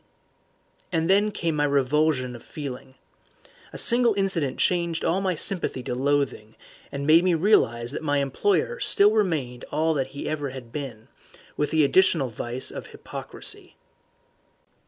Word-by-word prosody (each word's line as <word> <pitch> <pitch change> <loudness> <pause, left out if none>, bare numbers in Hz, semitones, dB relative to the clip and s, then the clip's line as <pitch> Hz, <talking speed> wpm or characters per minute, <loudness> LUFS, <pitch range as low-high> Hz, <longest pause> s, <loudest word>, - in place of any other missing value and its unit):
And 165 -2 0
then 200 +3 +4
came 170 -6 -2
my 145 - +1
revulsion 140 -2 +1
of 120 - -11
feeling. 135 -5 -8 0.8
A - - -8
single 235 -2 +4
incident 190 -9 -1
changed 170 -2 0
all 185 +4 +1
my 185 -2 0
sympathy 160 -7 0
to 125 - -3
loathing, 135 -4 -1 0.4
and 140 0 -4
made 160 +3 +6
me 180 -2 +3
realize 120 - +2
that 150 - -5
my 145 -2 0
employer 405 - 0
still 205 - +4
remained 155 - -1
all 160 +1 +1
that 135 -3 -1
he - - -5
had - - -2
ever 140 -4 -4
been, 120 -2 -8 0.5
with 150 - -1
the 160 -1 +3
additional 160 -4 +3
vice 120 +3 -3
of - - -7
hypocrisy. - - -7
150 Hz, 150 wpm, -25 LUFS, 130-180 Hz, 0.8 s, made